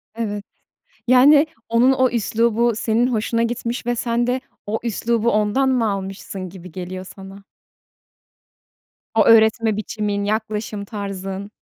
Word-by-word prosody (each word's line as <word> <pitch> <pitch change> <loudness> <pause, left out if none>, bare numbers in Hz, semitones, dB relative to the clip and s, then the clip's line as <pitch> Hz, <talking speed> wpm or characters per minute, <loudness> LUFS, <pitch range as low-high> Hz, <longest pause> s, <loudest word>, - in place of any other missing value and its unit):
Evet. 210 -3 -3 0.6
Yani, 285 +5 +6 0.2
onun 235 +3 +4
o 260 -1 +3
üslubu 235 0 +1
senin 230 +2 +1
hoşuna 230 -1 0
gitmiş 235 +1 -3
ve 240 0 0
sen 235 0 0
de 250 +1 0 0.2
o 215 +2 -2
üslubu 235 0 0
ondan 215 +6 +2
mı 240 -4 +1
almışsın 195 -1 -6
gibi 180 -1 -12
geliyor 185 +2 -6
sana? 195 0 -11 1.7
O 220 - +4
öğretme 220 -1 +4
biçimin, 210 -1 -2
yaklaşım 210 -1 -3
tarzın. 195 -1 -6
220 Hz, 125 wpm, -21 LUFS, 200-235 Hz, 1.7 s, Yani